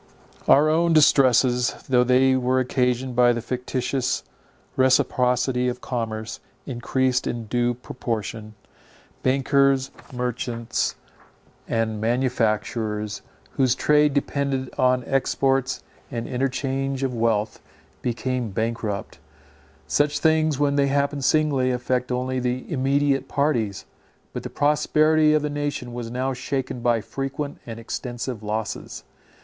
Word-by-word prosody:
Our 145 +3 +6
own 165 +2 +3
distresses, 130 -4 +4
though 125 -2 +4
they 130 +1 +4
were 130 0 +1
occasioned 125 0 0
by 120 0 +5
the 120 - -2
fictitious 125 +1 -2 0.5
reciprocity 125 -1 +2
of 125 0 -2
commerce, 110 -3 -4 0.3
encreased 130 +1 0
in 120 -1 -3
due 120 +2 0
proportion. 115 -3 -5 0.7
Bankers, 135 0 +2 0.2
merchants, 125 -2 -2 0.7
and 110 -2 -1
manufacturers, 110 -3 -1 0.3
whose 130 -2 +2
trade 150 0 +3
depended 140 -2 -1
on 125 -1 +2
exports 135 -1 0 0.3
and 115 -1 -4
interchange 135 +1 -2
of 130 -2 -1
wealth, 115 -2 0 0.4
became 125 -1 -2
bankrupt. 110 -1 -3 0.7
Such 145 0 +1
things, 155 -1 +2
when 145 0 +1
they 140 -1 +3
happen 140 +1 0
singly, 140 -2 +2
affect 125 0 -1
only 130 +1 -1
the 125 0 -2
immediate 135 0 +1
parties; 115 -9 0 0.5
but - - -4
the - - -6
prosperity 155 +1 +3
of 150 - +1
the 150 - -1
nation 145 -4 -3
was 120 -1 -5
now 130 +2 -2
shaken 130 0 -3
by 120 -1 +1
frequent 140 +5 -5
and 115 -1 -6
extensive 120 0 -5
losses. 110 +1 -4
130 Hz, 115 wpm, -24 LUFS, 120-135 Hz, 0.7 s, Our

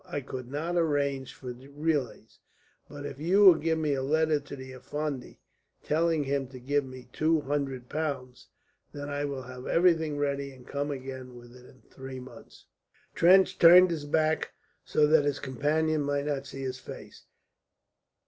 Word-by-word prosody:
I 175 -6 -5
could 130 -2 -7
not 160 +5 -2
arrange 140 -5 0
for 125 -2 -7
relays, 140 +1 -3 0.5
but 145 -1 -8
if 140 -1 -7
you 180 +6 +3
will 185 - +11
give 160 +1 -1
me 155 -2 0
a 135 - -1
letter 155 +2 +2
to 145 0 -9
the 130 -1 -9
Effendi 135 +1 -5 0.5
telling 160 0 +1
him 140 -1 -1
to 130 0 -11
give 140 +3 0
me 130 -2 -11
two 155 0 +2
hundred 135 -3 -3
pounds, 140 -5 -4 0.5
then 145 0 -6
I 145 0 -2
will 140 -2 -4
have 125 0 -9
everything 160 -4 +2
ready 140 -1 -2
and 130 -1 -16
come 145 +1 -3
again 130 -2 -7
within 125 +1 -15
three 130 -1 -8
months." 130 +1 -14 0.5
Trench 185 +3 +5
turned 180 +2 +8
his 155 -3 -3
back 155 +1 0 0.3
so 150 - +2
that 155 0 +4
his 145 -1 0
companion 150 +4 0
might 145 0 -1
not 140 -2 -2
see 135 0 -7
his 130 0 -4
face. - - -11
145 Hz, 165 wpm, -28 LUFS, 130-155 Hz, 0.5 s, will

